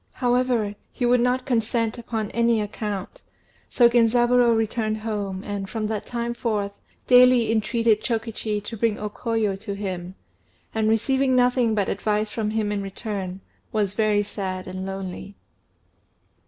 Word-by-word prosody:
However, 245 -4 +1 0.2
he 245 - -2
would 245 +1 +4
not 250 +1 +1
consent 230 -1 0
upon 225 -3 -3
any 235 -1 +2
account; 210 -2 -4 0.5
so 240 - +5
Genzaburô 240 0 +4
returned 220 0 -1
home, 205 -3 -4
and, 200 -2 -4
from 220 -1 -3
that 215 -2 -3
time 235 0 -2
forth, 210 -4 -2 0.2
daily 250 -2 +6
entreated 225 0 +2
Chokichi 225 -3 -2
to 225 - -6
bring 225 -1 +1
O 210 0 -4
Koyo 225 -3 -1
to 200 -1 -5
him, 185 -2 -5 0.6
and, 220 -1 +1
receiving 265 +4 +2
nothing 245 -2 +3
but 200 -2 +1
advice 210 +1 -1
from 215 -2 -2
him 215 -1 -1
in 205 -1 -1
return, 195 -2 -5 0.3
was 205 -3 0
very 210 -1 +2
sad 190 -2 -5
and 185 +1 -5
lonely. 195 +1 -6
220 Hz, 145 wpm, -24 LUFS, 205-235 Hz, 0.6 s, daily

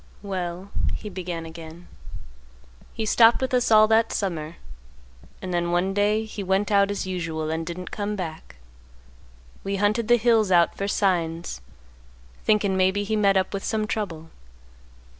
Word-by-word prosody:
"Well," 185 -1 -5 0.2
he 210 - -7
began 175 -3 -5
again; 165 +1 -11 1.0
"he 225 - -4
stopped 225 +2 +5
with 260 -1 -2
us 250 -1 +2
all 215 -1 +7
that 225 0 +3
summer, 165 -5 -3 0.9
and 185 -1 -4
then 175 0 0
one 175 +3 +1
day 210 +2 +1
he 215 -1 -7
went 195 +2 0
out 200 -1 +4
as 205 -1 -3
usual 165 -4 -3
and 160 +1 -2
didn't 175 +2 -7
come 210 0 -3
back. 165 - -7 1.1
We 195 0 -2
hunted 210 +3 +1
the 240 +1 +5
hills 225 -3 +3
out 170 -1 +4
for 200 - -3
signs, 170 - -1 0.8
thinkin' 205 -3 +2
maybe 190 +2 +2
he 215 +2 -1
met 200 -2 +3
up 190 +1 0
with 195 - -3
some 215 -1 -1
trouble. 170 -7 -4
195 Hz, 155 wpm, -24 LUFS, 175-210 Hz, 1.1 s, all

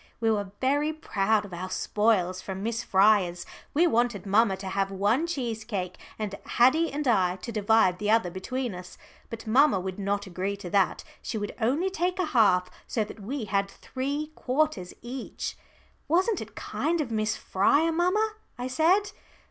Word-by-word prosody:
We 225 -1 +2
were 205 -2 -1
very 290 +4 +2
proud 215 -8 0
of 190 - -11
our 185 +2 -5
spoils 190 -2 +1
from 190 0 -6
Miss 230 +1 -1
Fryer's. 190 -3 +3 0.3
We 335 +4 +5
wanted 240 - +1
mamma 200 0 +3
to 190 0 -6
have 195 0 0
one 205 - +1
cheesecake 225 - -3 0.2
and 210 -2 -3
Haddie 310 +8 +3
and 290 0 -2
I 185 -6 +3
to 190 +5 -7
divide 210 -3 +3
the 210 - -1
other 220 -5 +3
between 245 +6 -3
us. 180 0 -10 0.3
But 230 -1 -7
mamma 250 -1 +4
would 185 +1 -5
not 200 +1 -1
agree 190 +2 -3
to 180 -3 -8
that. 195 -1 +2 0.2
She 225 - -4
would 205 -1 -4
only 295 +12 +1
take 360 0 -1
a 370 - +1
half, 190 -10 +3 0.2
so 220 - 0
that 210 - -10
we 235 +4 -4
had 200 -1 0
three 285 +7 -4
quarters 260 -10 -1
each. 245 +2 -5 0.5
"Wasn't 370 +7 +2
it - - -9
kind 335 +1 -1
of 280 -6 -2
Miss 215 0 0
Fryer, 285 +12 +2
mamma?" 415 +6 +1 0.2
I 250 +1 -4
said. 365 +9 +3
220 Hz, 170 wpm, -27 LUFS, 195-285 Hz, 0.5 s, We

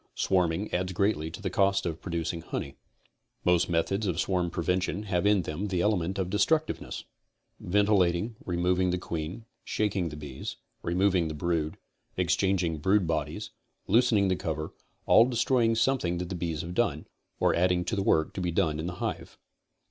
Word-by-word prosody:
Swarming 90 +1 +1
adds 90 +1 -1
greatly 95 -4 +1
to 95 +6 -9
the 95 - -2
cost 100 +1 +2
of 80 -2 -3
producing 85 -1 -3
honey. 70 - -5 0.7
Most 90 -1 +3
methods 95 +5 0
of 85 -3 -1
swarm 90 -2 +1
prevention 90 +3 -1
have 95 -1 0
in 105 -3 +4
them 85 +7 -3
the 90 -3 0
element 95 -2 +1
of 95 -2 -1
destructiyeness. 155 +10 0 0.6
Ventilating, 100 +1 +2
removing 90 +1 +1
the 90 - 0
queen, 85 +4 -5 0.2
shaking 100 -5 -1
the 75 - -8
bees, 75 -3 -6 0.3
removing 90 0 +2
the 80 - -4
brood, 80 -1 -1 0.4
exchanging 90 -5 +1
brood 95 +4 +3
bodies, 75 -2 -2 0.3
loosening 115 -4 +4
the 95 - +2
cover, 80 -3 -4 0.3
all 115 - +7
destroying 120 -1 +2
something 115 -7 +1
that 90 0 -4
the 95 - -3
bees 85 -2 -2
have 85 +1 -6
done, 90 -8 0 0.3
or - - +3
adding 90 0 +2
to 110 - -1
the 100 - 0
work 80 -5 +2
to 95 - -4
be 90 - 0
done 80 -2 +1
in 80 - -3
the 90 - -4
hive. - - -4
90 Hz, 170 wpm, -28 LUFS, 85-100 Hz, 0.7 s, all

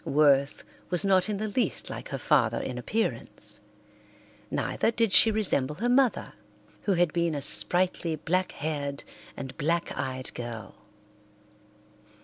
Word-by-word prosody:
Worth 140 -1 +2 0.3
was 180 +2 0
not 190 +1 +2
in 210 - -2
the 215 +2 -3
least 215 -1 -2
like - - -8
her 135 - -4
father 120 -4 +1
in 125 -1 -5
appearance. 220 - +2 0.9
Neither - - -1
did 230 -3 0
she 225 - +8
resemble 165 -10 +1
her 230 +9 -3
mother, 255 -1 +1 0.5
who 200 - +1
had 175 -3 +1
been 170 -2 -1
a 145 - -4
sprightly, 175 +1 +3
black 180 +4 -2
haired 145 -2 -4 0.3
and 135 -1 -8
black 170 +3 -1
eyed 130 0 -5
girl. 115 -4 -8
165 Hz, 135 wpm, -26 LUFS, 135-195 Hz, 0.9 s, she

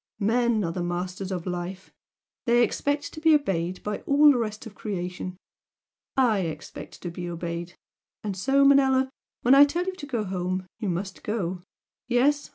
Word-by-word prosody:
Men 230 +1 +2
are 165 - -1
the 180 - -3
masters 180 +2 -3
of 180 -3 -3
life! 180 +1 -5 0.5
They 240 +1 +5
expect 285 +3 -1
to 310 - -8
be 320 -1 +6
obeyed 185 - -1
by 210 0 -2
all 290 +1 +7
the 255 - +1
rest 215 -2 -3
of 220 - -9
creation. 185 -3 -5 0.8
I 240 -6 +4
expect 165 -4 -6
to 175 - -4
be 175 +1 -5
obeyed! 170 0 -5 0.5
and 205 -2 -3
so, 275 +8 +3
Manella, 265 -1 +4 0.3
when 250 - +6
I 275 +1 +10
tell 340 +5 +1
you 375 - -2
to 290 - -7
go 240 -6 -1
home, 185 -1 -2
you 210 -4 -2
must 185 +2 -4
go! 190 -5 -2 0.5
Yes! 275 +4 +2
210 Hz, 170 wpm, -26 LUFS, 180-265 Hz, 0.8 s, I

